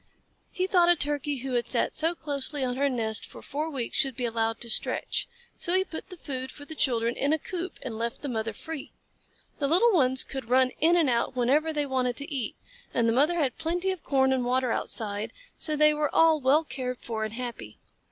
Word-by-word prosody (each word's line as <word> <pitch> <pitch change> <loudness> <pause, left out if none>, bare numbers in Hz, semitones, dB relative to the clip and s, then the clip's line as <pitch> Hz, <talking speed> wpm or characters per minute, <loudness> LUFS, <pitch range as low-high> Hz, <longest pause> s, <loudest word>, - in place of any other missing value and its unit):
He 370 - -1
thought 355 -2 +4
a 350 - +7
Turkey 290 -2 -1
who 265 - -3
had 240 -1 0
sat - - +1
so 330 +2 +2
closely 290 -2 -1
on 250 -1 -1
her 280 +2 +2
nest 220 -4 0
for - - -11
four 300 +4 -3
weeks 265 -6 -4
should 270 -3 +1
be 245 - -2
allowed 225 -1 0
to 240 - -3
stretch, 225 - +1 0.3
so 350 +1 0
he 375 - +4
put 340 -1 -8
the 365 - -9
food 260 -4 -5
for 290 - -12
the 315 - -8
children 240 -6 +1
in 285 +2 +1
a - - +3
coop 360 +3 -5
and 220 - -5
left 235 +5 -3
the - - -2
mother 225 -3 -2
free. 310 +6 -7 0.7
The 280 - +1
little 370 +11 +5
ones 260 -6 +4
could 265 -4 -7
run 255 0 +4
in 335 +3 +5
and 335 -4 +3
out 240 +1 +1
whenever 280 +6 +2
they 295 -2 0
wanted 255 -3 -1
to 285 +1 -5
eat, 260 -5 -2 0.4
and 230 -1 +3
the 230 - +3
mother 295 +8 +3
had 285 -6 0
plenty 350 +4 0
of 375 -3 -6
corn 265 -1 +3
and 255 -1 0
water 250 0 +1
outside, 210 -2 -2 0.2
so 310 - -1
they 305 0 +5
were 300 -1 0
all 325 -1 +5
well 280 +5 +4
cared 255 -4 -4
for 225 -2 -4
and 215 0 -4
happy. 235 - -6
270 Hz, 225 wpm, -27 LUFS, 245-315 Hz, 0.7 s, a